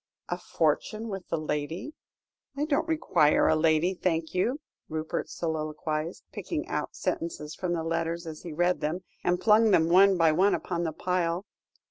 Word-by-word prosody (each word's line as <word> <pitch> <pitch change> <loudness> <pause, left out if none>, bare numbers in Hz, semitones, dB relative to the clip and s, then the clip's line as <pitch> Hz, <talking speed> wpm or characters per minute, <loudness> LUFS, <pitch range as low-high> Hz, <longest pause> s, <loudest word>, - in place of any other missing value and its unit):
"A - - -2
fortune 220 +1 -1
with 195 -3 -6
the 165 - -1
lady? 155 - -3 0.6
I 295 - +1
don't 315 +2 0
require 180 - +3
the - - +4
lady, 160 +3 +3
thank 165 -3 -1
you," 235 +10 0 0.3
Rupert 155 0 -3
soliloquised, 155 0 -3
picking, - - -4
out - - -3
sentences 155 -2 -3
from 180 -2 -2
the 165 -2 -1
letters 165 +1 -2
as 160 -1 -7
he 170 - -7
read 175 +3 +1
them, 170 +5 -2 0.2
and 180 0 +1
flung 220 +1 +6
them 165 -4 +4
one 190 +2 +6
by 165 -2 +5
one 190 +6 +3
upon 175 -1 -3
the 160 - -1
pile. 180 +1 -1
170 Hz, 165 wpm, -28 LUFS, 160-185 Hz, 0.6 s, flung